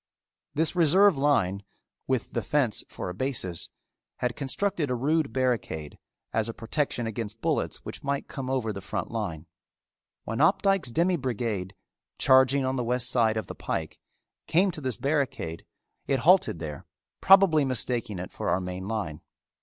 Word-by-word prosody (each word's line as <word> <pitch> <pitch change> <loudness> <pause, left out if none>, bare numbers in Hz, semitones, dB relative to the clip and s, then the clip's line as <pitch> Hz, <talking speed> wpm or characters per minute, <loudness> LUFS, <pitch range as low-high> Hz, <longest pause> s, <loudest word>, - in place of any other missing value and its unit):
This 160 +4 +2
reserve 180 +3 +5
line, 115 -9 +2 0.5
with 130 -2 -1
the 120 - 0
fence 120 0 0
for - - -6
a - - -4
basis, 95 -7 -2 0.5
had 125 -1 -1
constructed 160 +3 -1
a 125 - 0
rude 150 +4 +1
barricade 120 - -2 0.3
as 110 0 +1
a 115 - -6
protection 120 0 -1
against 110 0 -5
bullets - - -1
which - - -7
might 140 0 -2
come 130 -2 -5
over 125 -5 -1
the 100 - -6
front 100 - -4
line. 95 -9 -4 0.8
When - - -4
Opdycke's 195 -9 +3
demi 170 +8 +2
brigade, 110 - -3 0.4
charging 130 +1 +5
on 130 +1 -1
the 125 - 0
west 125 +1 +1
side 110 -3 +3
of 110 - -2
the - - -7
pike, 80 -1 -4 0.5
came 185 +4 +3
to 155 - -7
this 130 -4 -2
barricade, 135 - -2 0.4
it 135 - +1
halted 180 - +4
there, 75 -3 -7 0.3
probably 190 -6 +6
mistaking 120 -5 -2
it 90 +1 -6
for - - -3
our - - +2
main 90 +1 -5
line. 100 -9 -3
125 Hz, 160 wpm, -27 LUFS, 105-145 Hz, 0.8 s, probably